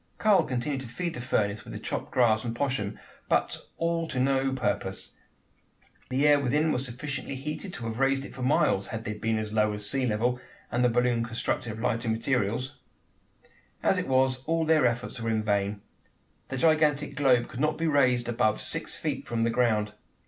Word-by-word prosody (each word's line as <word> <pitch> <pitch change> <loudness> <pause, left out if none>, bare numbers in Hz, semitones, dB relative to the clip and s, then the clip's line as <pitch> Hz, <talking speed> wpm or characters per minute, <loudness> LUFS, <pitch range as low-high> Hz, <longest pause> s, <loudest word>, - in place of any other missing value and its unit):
Karl 210 -3 +4
continued 130 +2 -2
to 130 - -8
feed 170 +8 -3
the 120 - -6
furnace 105 -4 0
with - - -9
the - - -5
chopped - - -4
grass 110 -4 +3
and 115 -1 -3
poshm, 120 -6 -1 0.3
but - - 0
all 165 0 0
to 130 - -3
no 135 +1 +2
purpose. 130 - -2 1.0
The 135 +3 +2
air 145 -1 +6
within 150 +4 +2
was 130 - 0
sufficiently 135 +3 -5
heated 150 +7 -5
to 120 - -7
have 115 +1 -4
raised 135 0 +2
it - - -10
for 130 - -8
miles 130 - +2
had 115 -1 -5
they 105 - -3
only 105 - -7
been 110 0 0
as 110 -1 -4
low 105 -1 +2
as 105 0 -4
the 100 - -2
sea 135 -2 0
level, 120 +3 0 0.3
and 120 +1 +1
the 125 - +5
balloon 120 0 +2
constructed 115 0 -2
of 110 - -8
lighter 115 0 0
materials. 115 +1 0 1.1
As - - +3
it - - -3
was, 130 -1 +2
all 165 0 +1
their 155 -5 +4
efforts 120 +1 -3
were 115 0 -2
in 110 -1 +1
vain. 100 -1 0 0.7
The 130 - -4
gigantic 150 -1 +3
globe 130 -4 +3
could 120 - -8
not 155 +2 +1
be 165 - -1
raised 125 -6 +3
above 110 -2 +1
six - - -4
feet - - -3
from 115 -1 0
the 115 - +2
ground. 110 -3 +1
125 Hz, 200 wpm, -28 LUFS, 115-140 Hz, 1.1 s, air